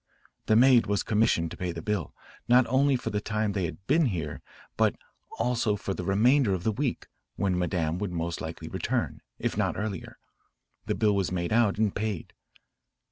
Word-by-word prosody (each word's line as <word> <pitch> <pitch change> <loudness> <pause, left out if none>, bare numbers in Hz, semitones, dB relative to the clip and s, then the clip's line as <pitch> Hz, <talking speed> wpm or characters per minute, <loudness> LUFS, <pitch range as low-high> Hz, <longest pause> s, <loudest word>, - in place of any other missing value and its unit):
The 110 - +4
maid 125 0 +6
was 100 -1 0
commissioned 105 -7 +2
to - - -8
pay 90 -1 -2
the 85 -1 -7
bill, 105 -7 -2 0.3
not 125 +1 +6
only 135 +3 +3
for 125 - -3
the 105 - -1
time 105 0 -1
they 95 -3 -1
had 95 +3 -7
been 165 0 +3
here, 80 -9 -4 0.3
but - - +2 0.4
also 115 -4 +1
for 100 -1 -4
the - - -5
remainder 110 +2 +3
of 90 - -5
the 110 - +2
week, 130 +3 -2 0.3
when 95 -1 0
Madame 90 -2 -1
would 100 -2 -3
most 85 -1 -3
likely - - -6
return, - - -2 0.2
if - - -2
not - - 0
earlier. 100 -3 -5 0.7
The - - 0
bill 105 -2 +2
was 95 -3 0
made 85 +1 -1
out 110 -4 +3
and 110 -2 +1
paid. 105 -5 -3
105 Hz, 190 wpm, -28 LUFS, 90-115 Hz, 0.7 s, maid